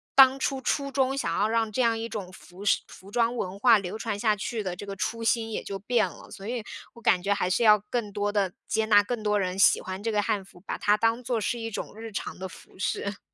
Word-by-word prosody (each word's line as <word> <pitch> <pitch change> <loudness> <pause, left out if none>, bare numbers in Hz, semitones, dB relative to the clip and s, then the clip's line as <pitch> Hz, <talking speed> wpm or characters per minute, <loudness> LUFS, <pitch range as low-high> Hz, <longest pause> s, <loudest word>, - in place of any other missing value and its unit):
当 265 0 +8
初 270 0 -1
初 275 +1 -1
衷 270 0 +1
想 170 -11 -1
要 210 - +3
让 225 -1 0
这 235 - 0
样 230 -2 +3
一 225 +1 -4
种 200 -5 -5
服 185 +2 -12
饰 - - +4
服 190 - -14
装 235 +2 +1
文 185 -3 -3
化 230 +1 +6
流 195 0 -4
传 220 -2 -3
下 215 -1 +3
去 220 +2 -3
的 185 -3 -3
这 190 - -8
个 200 - -5
初 230 +5 -2
心 225 0 +1
也 - - -3
就 195 -1 -5
变 225 +3 +2
了。 - - -13
所 195 - -9
以， 240 -1 -3 0.3
我 235 - -15
感 185 -5 +3
觉 200 +1 +2
还 200 -3 -1
是 185 - +2
要 210 -1 +7
更 230 -4 -2
多 205 +1 -1
地 200 -3 +1 0.2
接 220 0 +1
纳 205 -1 +6
更 225 +1 -4
多 210 -1 +2
人 185 -1 -2
喜 195 - +6
欢 190 +1 -6
这 225 - 0
个 210 -1 +2
汉 200 -1 -1
服， 190 -2 -17
把 - - -3
它 210 0 +3
当 230 +3 +1
作 240 -1 0
是 230 +3 -1
一 225 0 -4
种 205 - -5
日 225 0 -7
常 205 - -5
的 190 0 -6
服 - - -15
饰。 200 +1 -2
215 Hz, 290 characters per minute, -27 LUFS, 200-230 Hz, 0.3 s, 当